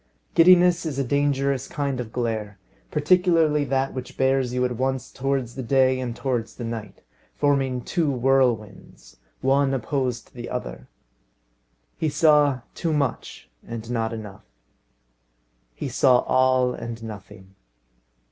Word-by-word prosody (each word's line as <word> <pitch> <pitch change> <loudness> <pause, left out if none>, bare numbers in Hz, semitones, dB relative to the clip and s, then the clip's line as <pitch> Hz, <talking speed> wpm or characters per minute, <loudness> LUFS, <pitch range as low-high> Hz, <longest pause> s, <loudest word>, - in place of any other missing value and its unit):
Giddiness 180 0 +6
is 155 -5 -4
a 140 - +1
dangerous 140 0 0
kind 140 -3 -3
of 115 -3 -5
glare, 110 -4 -3 0.3
particularly 160 -2 +3
that 135 0 -1
which 130 0 -7
bears 130 -1 +1
you 125 0 0
at 125 -1 -2
once 130 +1 -2
towards 135 -3 -2
the 130 - -5
day 130 +1 +2
and 120 -2 -4
towards 120 -4 -3
the 120 - -7
night, 115 -3 -6 0.3
forming 135 -3 +1
two 165 0 0
whirlwinds, 120 - -1 0.2
one 135 +1 +2
opposed 125 -1 -2
to - - -35
the 120 -1 -7
other. 125 - -6 1.1
He 160 - +1
saw 150 -3 +3
too 165 -2 -2
much, 145 -3 -3 0.2
and 115 0 -7
not 115 -1 -1
enough. 105 - -9 1.3
He - - -4
saw 125 -2 +4
all, 130 -1 +2
and 115 -1 -7
nothing. 100 -3 -10
130 Hz, 135 wpm, -24 LUFS, 120-140 Hz, 1.3 s, Giddiness